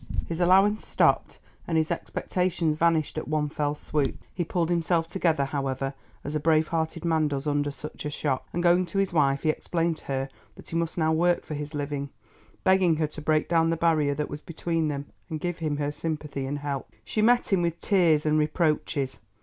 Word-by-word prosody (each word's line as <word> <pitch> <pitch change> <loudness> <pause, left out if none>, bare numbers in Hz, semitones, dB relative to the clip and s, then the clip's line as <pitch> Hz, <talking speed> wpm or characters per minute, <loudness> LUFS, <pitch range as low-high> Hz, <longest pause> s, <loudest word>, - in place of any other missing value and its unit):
His 165 0 -4
allowance 195 +4 +4
stopped - - +2 0.3
and 165 - +1
his 160 +1 +1
expectations 170 -1 -1
vanished 160 -1 +1
at - - -7
one 150 -1 0
fell 145 0 -1
swoop. 145 -2 -1 0.2
He 175 - -1
pulled 170 0 -1
himself 170 -1 +2
together, 165 -6 +1
however, 135 -1 -2 0.3
as 145 - -4
a 155 - 0
brave 155 0 +3
hearted 165 0 -2
man 160 -2 +2
does 140 -1 -3
under 145 -1 +1
such 145 +2 -8
a - - -1
shock, 145 -3 -2
and 175 - -2
going 175 +1 +4
to 195 - -5
his 195 -2 +1
wife 140 -3 +2
he 155 - +2
explained 165 0 -1
to - - -18
her 135 0 -2 0.3
that - - -14
he - - -5
must 165 0 -1
now 160 -1 +2
work 175 +2 +2
for - - -5
his 150 +1 -5
living, 145 -1 -3 0.5
begging 190 -3 +4
her 155 0 +1
to 155 +1 -7
break 155 0 +2
down 165 -1 +3
the 165 - 0
barrier 155 -4 +2
that 150 +1 -2
was 145 - -7
between 165 -1 -2
them 140 -1 -3 0.2
and 160 -2 -3
give 175 +1 -3
him 155 -3 -1
her 145 0 -1
sympathy 150 -3 -4
and 145 +2 -2
help. 140 -2 -4 0.2
She 215 - -1
met 240 -1 +3
him 185 - +4
with 170 -1 -1
tears 170 -7 +3
and 155 0 +3
reproaches. 150 -3 0
155 Hz, 210 wpm, -27 LUFS, 145-170 Hz, 0.5 s, allowance